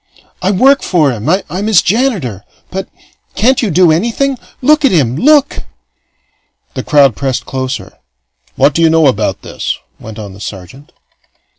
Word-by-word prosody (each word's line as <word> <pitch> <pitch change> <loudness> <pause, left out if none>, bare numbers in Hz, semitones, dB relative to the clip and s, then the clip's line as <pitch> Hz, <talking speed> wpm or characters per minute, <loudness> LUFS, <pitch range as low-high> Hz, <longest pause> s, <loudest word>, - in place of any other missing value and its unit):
"I 185 - 0
work 265 +8 +3
for 155 -7 +1
him. 115 +3 -4
I'm 185 +2 -1
his 215 -5 +4
janitor. 190 - -1 0.3
But 190 0 -5 0.5
can't 255 +5 +2
you 225 - -1
do 180 -1 +4
anything? 235 - 0 0.2
Look 300 +3 +3
at 275 - +5
him! 135 -9 +1
Look!" 285 - +3 1.1
The - - -4
crowd 140 -6 +3
pressed 135 0 -3
closer. 130 0 -5 0.6
"What 145 - +3
do 165 - 0
you 165 - +5
know 160 -1 +3
about 135 - 0
this?" - - -4 0.2
went 110 0 -10
on 105 -3 -8
the 100 - -14
sergeant. 100 +8 -10
165 Hz, 155 wpm, -13 LUFS, -, 1.1 s, at